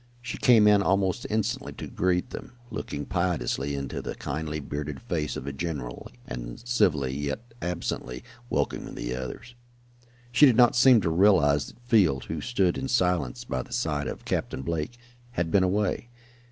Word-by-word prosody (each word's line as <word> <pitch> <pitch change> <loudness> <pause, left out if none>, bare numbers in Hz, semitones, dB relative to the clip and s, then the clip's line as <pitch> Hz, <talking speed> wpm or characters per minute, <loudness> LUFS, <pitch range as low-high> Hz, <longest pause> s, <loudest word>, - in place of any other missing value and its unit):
She 120 0 -6
came 115 -4 +6
in 105 -1 +6
almost 95 +3 +1
instantly 110 +5 -1
to - - -7
greet 90 +6 0
them, - - -8 0.2
looking 70 - -4
piteously 85 -6 -1
into 70 -1 -4
the - - -5
kindly, 75 +2 -3
bearded 75 0 -5
face 85 -11 -2
of - - -5
the 70 0 -5
general, 70 -6 -5 0.2
and - - -6
civilly, 75 - +2
yet 75 +12 -4
absently, 85 -8 -3 0.3
welcoming - - -2
the - - -3
others. 100 - -7 0.8
She 145 +4 +7
did 125 - +4
not 120 -1 +6
seem 120 -2 +7
to 85 -3 0
realize 80 -6 +4
that - - -14
Field, 95 - +3
who 80 -2 -4
stood 95 -7 +1
in 135 - -3
silence 90 - +1
by 65 - -2
the - - -13
side 75 -3 -1
of - - -6
Captain 65 - -2
Blake, 85 - -3 0.4
had 85 -6 -1
been 100 - +5
away. 100 +5 0
85 Hz, 165 wpm, -27 LUFS, 70-110 Hz, 0.8 s, She